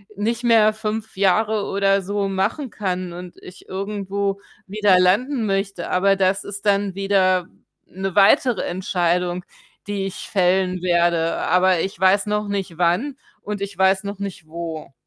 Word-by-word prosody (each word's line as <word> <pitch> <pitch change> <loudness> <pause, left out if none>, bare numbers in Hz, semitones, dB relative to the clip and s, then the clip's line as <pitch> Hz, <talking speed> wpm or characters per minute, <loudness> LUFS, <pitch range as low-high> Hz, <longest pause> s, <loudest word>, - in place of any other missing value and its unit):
nicht 230 +4 -2
mehr 220 -2 +5
5 220 0 -4
Jahre 205 +2 +2
oder 195 0 +1
so 200 +1 -2
machen 210 +8 -1
kann 185 -4 -3
und 180 0 -9
ich 180 - -13
irgendwo 200 0 -3 0.3
wieder 200 -2 +3
landen 225 +7 +2
möchte. 195 -3 -2
Aber 195 +2 +3
das 190 +1 +1
ist 200 +1 -8
dann 200 -1 +1
wieder 185 -2 +1 0.4
'ne 190 0 -5
weitere 230 +3 +4
Entscheidung, 180 0 -1 0.4
die 200 -1 -2
ich 190 - -7
fällen 185 -1 +1
werde. 170 -2 +1
Aber 180 -1 +2
ich 190 +3 -3
weiß 190 +2 +3
noch 210 0 -2
nicht 195 -5 -3
wann 180 +11 +1 0.3
und 205 -1 -5
ich 200 -2 -5
weiß 190 +1 +3
noch 200 0 -6
nicht 195 -5 -6
wo. 160 -3 -7
195 Hz, 150 wpm, -21 LUFS, 180-205 Hz, 0.4 s, mehr